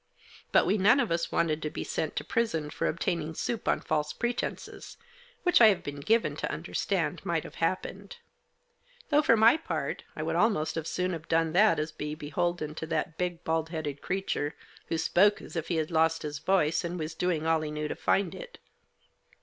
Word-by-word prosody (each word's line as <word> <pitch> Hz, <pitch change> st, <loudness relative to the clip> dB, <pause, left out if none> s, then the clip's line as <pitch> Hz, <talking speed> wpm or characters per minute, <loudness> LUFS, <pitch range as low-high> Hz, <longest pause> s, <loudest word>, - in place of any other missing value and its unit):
But -, -, +5 dB
we 210 Hz, -, +2 dB
none 225 Hz, +8 st, +5 dB
of 240 Hz, -8 st, 0 dB
us 170 Hz, 0 st, 0 dB
wanted 155 Hz, -2 st, +1 dB
to 155 Hz, -, -2 dB
be -, -, -5 dB
sent 155 Hz, -, -3 dB
to -, -, -2 dB
prison 165 Hz, -10 st, -1 dB
for -, -, -1 dB
obtaining 160 Hz, -1 st, -2 dB
soup 230 Hz, +5 st, -3 dB
on -, -, +2 dB
false 150 Hz, -1 st, -1 dB
pretences, 240 Hz, 0 st, -4 dB, 0.5 s
which 355 Hz, -8 st, +4 dB
I 225 Hz, -, +10 dB
have 205 Hz, -3 st, +2 dB
been 145 Hz, 0 st, -6 dB
given 225 Hz, +11 st, +2 dB
to -, -, -2 dB
understand -, -, -2 dB
might -, -, -1 dB
have -, -, -10 dB
happened. -, -, -2 dB, 0.9 s
Though, 295 Hz, -1 st, +5 dB
for 260 Hz, -7 st, +4 dB
my 230 Hz, +6 st, +6 dB
part, 160 Hz, -, -3 dB
I 155 Hz, -, -4 dB
would 165 Hz, +1 st, -1 dB
almost 180 Hz, -5 st, +2 dB
as 165 Hz, -1 st, -3 dB
soon 180 Hz, 0 st, -1 dB
have 160 Hz, -1 st, -7 dB
done 165 Hz, -1 st, +1 dB
that 200 Hz, -2 st, +5 dB
as 155 Hz, +1 st, -2 dB
be 150 Hz, 0 st, -5 dB
beholden 155 Hz, +1 st, -2 dB
to 160 Hz, +1 st, -6 dB
that 160 Hz, 0 st, -2 dB
big, 175 Hz, -1 st, -2 dB
bald 160 Hz, 0 st, 0 dB
headed 150 Hz, -4 st, -4 dB
creature, 180 Hz, -5 st, -2 dB, 0.3 s
who 165 Hz, -, -1 dB
spoke 195 Hz, +5 st, +3 dB
as -, -, -11 dB
if 165 Hz, -2 st, -2 dB
he 175 Hz, -, -1 dB
had 160 Hz, +1 st, -1 dB
lost 160 Hz, 0 st, +2 dB
his 150 Hz, -2 st, -4 dB
voice, 165 Hz, -3 st, +2 dB
and 175 Hz, +1 st, -3 dB
was 155 Hz, -1 st, -4 dB
doing 165 Hz, -2 st, -1 dB
all 160 Hz, -1 st, +2 dB
he 155 Hz, -, -3 dB
knew 150 Hz, 0 st, -3 dB
to -, -, -3 dB
find 195 Hz, -2 st, +1 dB
it. -, -, -10 dB
165 Hz, 205 wpm, -29 LUFS, 155-195 Hz, 0.9 s, I